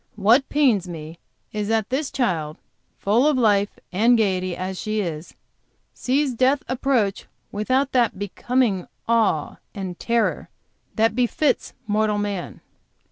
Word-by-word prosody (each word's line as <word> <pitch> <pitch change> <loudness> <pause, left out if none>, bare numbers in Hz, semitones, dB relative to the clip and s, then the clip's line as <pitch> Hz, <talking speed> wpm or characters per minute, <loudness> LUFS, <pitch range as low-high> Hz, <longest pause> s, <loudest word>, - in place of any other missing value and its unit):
What 225 +7 +3
pains 245 -11 +2
me 160 -1 -8 0.3
is 210 -1 -3
that 225 0 0
this 275 +2 -1
child, 165 - -1 0.4
full 230 +8 +2
of 300 -3 +2
life 205 -4 +2
and 230 +6 +4
gayety 185 -4 0
as 185 0 -4
she 215 0 -2
is, 165 -4 -5 0.6
sees 270 +1 0
death 260 +4 +2
approach 245 -6 0 0.2
without 260 +6 0
that 240 -6 +2
becoming 205 0 0 0.2
awe 225 -10 +1 0.2
and 190 -3 -5
terror 230 -1 0 0.5
which 225 +1 +3
befits 250 +3 0
mortal 210 0 +1
man." 205 -3 -4
215 Hz, 130 wpm, -23 LUFS, 190-250 Hz, 0.6 s, and